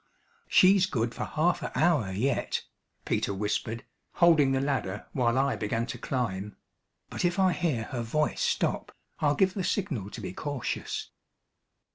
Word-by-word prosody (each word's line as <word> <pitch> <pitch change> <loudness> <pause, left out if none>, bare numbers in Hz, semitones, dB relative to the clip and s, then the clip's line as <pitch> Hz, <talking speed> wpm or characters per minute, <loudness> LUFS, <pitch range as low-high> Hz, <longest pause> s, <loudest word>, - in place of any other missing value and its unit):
"She's 190 0 +6
good 115 -8 -1
for - - -3
half 165 +2 +1
a - - -4
hour 150 - +3
yet," 125 +9 -1 0.4
Peter 100 - 0
whispered, 110 +4 -2 0.3
holding 160 -6 +5
the 135 - +2
ladder 135 -8 -2
while 120 -1 +2
I 135 +1 +2
began 115 +2 -1
to - - -6
climb; 105 -6 -3 0.5
"but - - -3
if 175 +2 +1
I 190 -1 +4
hear 150 -12 0
her 120 0 -4
voice 150 +7 0
stop, - - 0 0.3
I'll 145 -1 +2
give 190 +3 +3
the 190 - -2
signal 150 - -1
to - - -8
be - - -5
cautious." 145 +2 -4
135 Hz, 155 wpm, -28 LUFS, 115-170 Hz, 0.5 s, She's